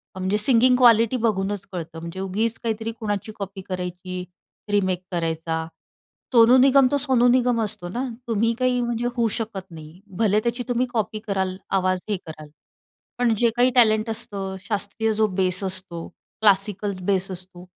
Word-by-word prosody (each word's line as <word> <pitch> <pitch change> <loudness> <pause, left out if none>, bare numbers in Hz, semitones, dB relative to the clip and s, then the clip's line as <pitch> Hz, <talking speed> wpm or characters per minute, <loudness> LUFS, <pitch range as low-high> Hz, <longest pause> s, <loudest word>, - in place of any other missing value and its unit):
म्हणजे 190 +2 0
singing 250 +3 +4
quality 235 0 +5
बघूनच 200 -1 -2
कळतं. 165 -2 -6
म्हणजे 170 +3 -7
उगीच 210 +4 -1
काहीतरी 225 -1 -3
कुणाची 205 -1 -3
कॉपी 195 0 -6
करायची, 180 0 -5 0.5
रिमेक 185 -3 +1
करायचा. 160 -1 -2 0.7
सोनू 235 +2 +7
निगम 270 0 +6
तर 285 - +3
सोनू 255 -3 +3
निगम 245 -1 +3
असतो 190 -4 -4
ना, 245 +8 -3 0.2
तुम्ही 230 +1 +1
काही 250 -1 +2
म्हणजे 240 0 -2
होऊ 235 -1 +2
शकत 210 -4 -5
नाही. 160 +2 -11 0.2
भले 210 -2 +3
त्याची 240 +1 -1
तुम्ही 245 +1 +1
कॉपी 215 -1 -1
कराल, 190 -2 -1 0.2
आवाज 185 -1 +1
हे 205 - 0
कराल. 155 -1 -9 0.7
पण 245 -2 +2
जे 235 +2 +3
काही 245 +1 +4
टॅलेंट 220 -2 +4
असतं, 200 -4 -4
शास्त्रीय 220 +1 -1
जो 215 0 +2
बेस 185 -1 -1
असतो, 185 -3 -5 0.3
क्लासिकल 200 0 +2
बेस 195 -1 +1
असतो, 180 0 -7
205 Hz, 155 wpm, -23 LUFS, 185-230 Hz, 0.7 s, सोनू